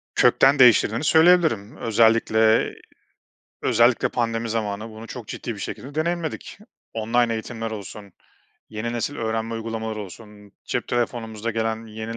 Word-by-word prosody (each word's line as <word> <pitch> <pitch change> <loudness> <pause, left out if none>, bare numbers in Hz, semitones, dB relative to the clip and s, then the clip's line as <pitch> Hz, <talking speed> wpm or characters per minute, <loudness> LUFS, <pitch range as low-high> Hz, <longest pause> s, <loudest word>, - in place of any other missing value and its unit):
Kökten 140 +1 +4
değiştirdiğini 115 0 +5
söyleyebilirim. 160 - +4
Özellikle 110 0 +3 0.9
özellikle 120 +1 +3
pandemi 115 -1 -2
zamanı 110 -1 -3
bunu 110 +1 -11
çok 120 -4 -8
ciddi 115 - -5
bir - - -11
şekilde 135 +7 -7
deneyimledik. 165 0 -3 0.4
Online 115 +1 +1
eğitimler 115 0 -5
olsun, 100 -2 -9 0.6
yeni 110 +2 -4
nesil 120 +5 -3
öğrenme 115 -1 -2
uygulamaları 110 -1 -4
olsun, 105 +1 -12
cep 120 - -3
telefonumuza 115 -2 -2
gelen 110 0 -2
yeni 110 +1 -7
115 Hz, 125 wpm, -23 LUFS, 110-120 Hz, 0.9 s, değiştirdiğini